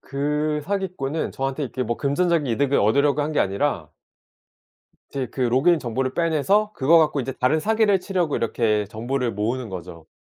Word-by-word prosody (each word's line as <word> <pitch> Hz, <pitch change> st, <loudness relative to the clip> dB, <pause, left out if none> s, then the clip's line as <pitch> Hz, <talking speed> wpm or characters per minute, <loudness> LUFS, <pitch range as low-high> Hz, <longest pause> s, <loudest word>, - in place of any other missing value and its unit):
그 150 Hz, +2 st, -1 dB
사기꾼은 180 Hz, -7 st, -3 dB
저한테 135 Hz, +2 st, -2 dB
이렇게 130 Hz, 0 st, -3 dB
금전적인 145 Hz, +7 st, 0 dB
이득을 135 Hz, +3 st, +1 dB
얻으려고 140 Hz, +7 st, +2 dB
한 150 Hz, +2 st, -3 dB
게 -, -, +1 dB
아니라 95 Hz, -, -1 dB, 1.2 s
제 135 Hz, -2 st, -3 dB
그 125 Hz, -, -9 dB
로그인 130 Hz, +8 st, +3 dB
정보를 130 Hz, 0 st, -3 dB
빼내서 175 Hz, +6 st, +1 dB
그거 155 Hz, +5 st, +4 dB
갖고 150 Hz, -3 st, +2 dB
이제 135 Hz, +1 st, -4 dB
다른 130 Hz, +5 st, +1 dB
사기를 215 Hz, 0 st, +2 dB
치려고 180 Hz, -6 st, -1 dB
이렇게 110 Hz, -2 st, 0 dB
정보를 120 Hz, +3 st, -2 dB
모으는 115 Hz, +4 st, -2 dB
거죠. 85 Hz, -4 st, -9 dB
140 Hz, 370 characters per minute, -23 LUFS, 120-160 Hz, 1.2 s, 그거